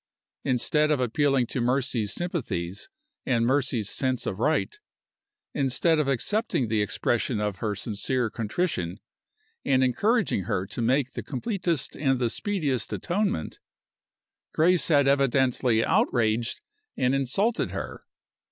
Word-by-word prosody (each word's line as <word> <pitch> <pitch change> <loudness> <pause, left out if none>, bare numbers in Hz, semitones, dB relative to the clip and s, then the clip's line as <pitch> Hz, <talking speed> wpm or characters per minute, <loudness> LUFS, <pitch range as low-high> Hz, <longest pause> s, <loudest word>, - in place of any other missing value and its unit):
Instead 150 +4 +1
of 150 -3 +2
appealing 135 +1 +2
to 120 - -3
Mercy's 125 -3 0
sympathies 105 - -4 0.3
and 120 -3 +1
Mercy's 130 -5 +1
sense 130 +2 -1
of 95 - -3
right 160 - 0 0.7
instead 145 +4 +2
of 150 - +1
accepting 140 - 0
the 110 -1 +1
expression 115 +2 0
of 105 -2 -2
her 105 -2 -2
sincere 115 +3 -2
contrition, 110 - -2 0.6
and 130 -1 +3
encouraging 200 - +1
her 90 +1 -1
to 100 +5 -6
make 130 +2 +1
the - - -5
completest 170 - -2
and 135 -2 +1
the 120 -2 0
speediest 155 - -1
atonement 185 - -2 1.0
Grace 175 +2 +4
had 145 -4 +4
evidently 130 -4 +2
outraged 115 0 +1 0.4
and 130 0 +2
insulted 195 - +1
her. - - -6
130 Hz, 125 wpm, -26 LUFS, 115-150 Hz, 1.0 s, Grace